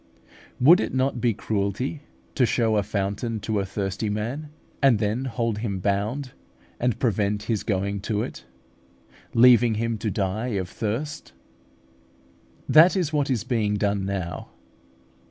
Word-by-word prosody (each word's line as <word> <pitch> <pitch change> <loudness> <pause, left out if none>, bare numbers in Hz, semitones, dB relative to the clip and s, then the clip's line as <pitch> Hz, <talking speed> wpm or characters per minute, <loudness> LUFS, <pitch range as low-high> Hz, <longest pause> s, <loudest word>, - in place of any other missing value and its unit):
Would 165 +9 +7
it - - -2
not 130 -2 0
be 120 - +3
cruelty 105 +9 -2 0.3
to 125 -4 +3
show 115 -1 +1
a 105 - +3
fountain 100 +3 -2
to 110 -1 -1
a 95 - -2
thirsty 100 +2 -3
man, 120 +9 -3 0.3
and 135 -5 +5
then 110 +5 -1
hold 115 -3 -2
him 105 -4 -2
bound, 105 +8 -1 0.5
and 125 -2 0
prevent 105 -3 0
his 110 -1 -1
going 100 -1 -1
to 105 +1 -1
it, - - -7 0.9
leaving 120 -1 +6
him 115 0 -2
to 110 - -2
die 105 +4 -2
of 90 -1 -4
thirst? 115 +10 -4 1.3
That 170 +5 +6
is 165 -5 -1
what 145 -2 +1
is 120 -6 0
being 110 -4 0
done 100 -1 0
now. 95 -4 -4
110 Hz, 145 wpm, -24 LUFS, 100-125 Hz, 1.3 s, Would